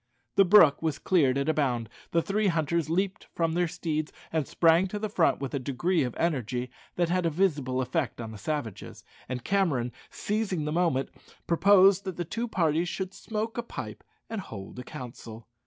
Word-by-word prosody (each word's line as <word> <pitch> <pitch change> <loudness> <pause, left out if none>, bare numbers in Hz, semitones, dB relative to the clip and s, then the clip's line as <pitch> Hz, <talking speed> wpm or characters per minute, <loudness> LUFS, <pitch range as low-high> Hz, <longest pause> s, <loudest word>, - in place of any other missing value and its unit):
The 195 - +6
brook 175 -6 +7
was 160 -3 -1
cleared 145 -7 +2
at 140 - -1
a 160 - +3
bound; 125 -7 0 0.2
the 170 -1 +1
three 210 +1 +1
hunters 165 -1 0
leaped 190 +3 -1
from 165 -1 +1
their 175 +1 +1
steeds 155 -3 -3 0.2
and 155 -4 0
sprang 165 +2 +4
to 210 - -4
the 215 +1 -3
front 180 -5 +2
with 135 -2 -4
a 140 - 0
degree 155 +7 0
of 125 -3 -2
energy 125 -6 -1 0.2
that 175 -1 +1
had 180 +1 +1
a - - +2
visible 145 -7 0
effect 125 0 -2
on 115 -2 -5
the 110 - -9
savages; 125 -4 -5 0.3
and 125 -2 -4
Cameron, 160 -12 +1 0.2
seizing 200 -7 -2
the 150 - -2
moment, 160 -6 +1 0.4
proposed 195 +2 +5
that 190 -3 -4
the 175 - -2
two 230 +8 -3
parties 170 -4 +1
should 190 0 -4
smoke 225 +2 -4
a - - +1
pipe 235 - -7 0.2
and 225 -2 -4
hold 100 - -9
a - - -6
council. 120 -5 -9
165 Hz, 190 wpm, -28 LUFS, 130-185 Hz, 0.4 s, brook